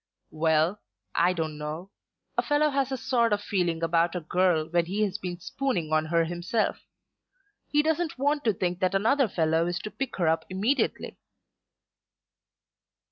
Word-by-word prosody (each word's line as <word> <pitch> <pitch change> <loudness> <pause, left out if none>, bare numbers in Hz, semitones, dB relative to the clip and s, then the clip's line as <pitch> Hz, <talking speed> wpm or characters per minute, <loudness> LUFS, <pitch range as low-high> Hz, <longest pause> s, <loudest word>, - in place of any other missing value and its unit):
"Well; 160 +4 +1 0.3
I 180 - +3
don't 160 -4 -3
know. 155 +6 -6 0.4
A - - +3
fellow 295 0 +2
has 275 -1 0
a 265 - -1
sort 235 -2 +1
of 205 - +1
feeling 175 -5 -1
about 165 +1 +2
a - - 0
girl 170 -1 +1
when 170 0 +1
he 205 +4 0
has 205 0 -1
been 180 -3 -5
spooning 180 - -2
on 155 0 +3
her 165 +1 +2
himself. 175 +6 -1 0.9
He 295 0 +2
doesn't 320 +1 0
want 290 +2 +1
to 220 - +3
think 180 -1 -2
that 185 0 +1
another 235 +7 +3
fellow 165 -2 +1
is 175 +1 -1
to 210 - -6
pick 250 +6 -4
her 175 -4 0
up 160 0 +2
immediately." 210 +10 -1
185 Hz, 165 wpm, -27 LUFS, 165-235 Hz, 0.9 s, I